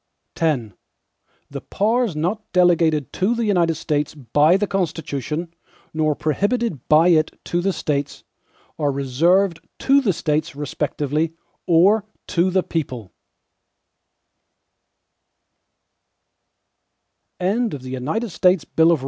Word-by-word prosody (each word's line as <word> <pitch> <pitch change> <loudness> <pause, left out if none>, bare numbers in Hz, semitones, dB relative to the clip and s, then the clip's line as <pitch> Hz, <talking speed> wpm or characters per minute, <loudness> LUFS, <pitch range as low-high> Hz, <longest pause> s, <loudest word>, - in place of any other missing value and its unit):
X 130 -11 -1 0.8
The - - -6
powers 225 -2 0
not 180 +8 -3
delegated 165 -5 +2
to 200 +6 +1
the 235 -1 -1
United 175 -5 +2
States 150 0 -2
by 150 - +3
the 205 - 0
Constitution, 165 - -3 0.4
nor 155 -1 +1
prohibited 200 - -1
by 160 +3 +5
it 155 -2 +2
to 175 - -1
the 195 +2 +1
States, 145 -5 -3 0.6
are 145 -2 +1
reserved 165 +7 +1 0.2
to 275 +1 +3
the 220 -7 +2
States 155 -2 -2
respectively, 150 +2 -2 0.3
or 190 +5 +4 0.3
to 175 +2 +2
the 185 0 +1
people. 125 - -4
165 Hz, 90 wpm, -21 LUFS, 150-190 Hz, 0.8 s, by